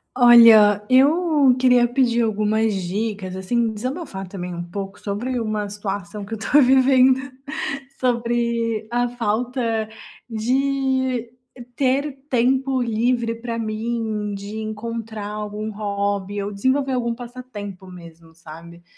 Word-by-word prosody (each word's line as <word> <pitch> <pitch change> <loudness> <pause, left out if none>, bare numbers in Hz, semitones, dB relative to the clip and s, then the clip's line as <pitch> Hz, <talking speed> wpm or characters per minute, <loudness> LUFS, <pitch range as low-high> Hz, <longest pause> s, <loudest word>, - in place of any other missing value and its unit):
Olha, 225 -4 +7
eu 290 0 +4
queria 250 -2 +4
pedir 240 -1 +1
algumas 220 0 +1
dicas, 200 0 -3
assim, 225 +4 -1
desabafar 235 - -5
também 180 -1 -6
um 175 0 -5
pouco 195 +2 -7
sobre 240 +5 -3
uma 215 -2 -2
situação 200 -1 -5
que 205 +3 -5
eu - - -8
estou 235 +8 +3
vivendo. 260 0 +5 0.8
Sobre 235 -2 0
a 245 0 +1
falta 230 -1 -2 0.4
de 260 +1 0 0.4
ter 275 +1 0
tempo 260 +2 +1
livre 235 0 0
pra 230 0 -5
mim, 220 -2 -3
de 200 +2 -7
encontrar 220 -1 -5
algum 210 +1 -5
hobby 200 -1 -2
ou 205 - -4
desenvolver 265 +6 0
algum 235 -2 -1
passatempo 230 -6 -9
mesmo, 165 -2 -14
sabe? 170 +1 -13
225 Hz, 115 wpm, -21 LUFS, 205-250 Hz, 0.8 s, Olha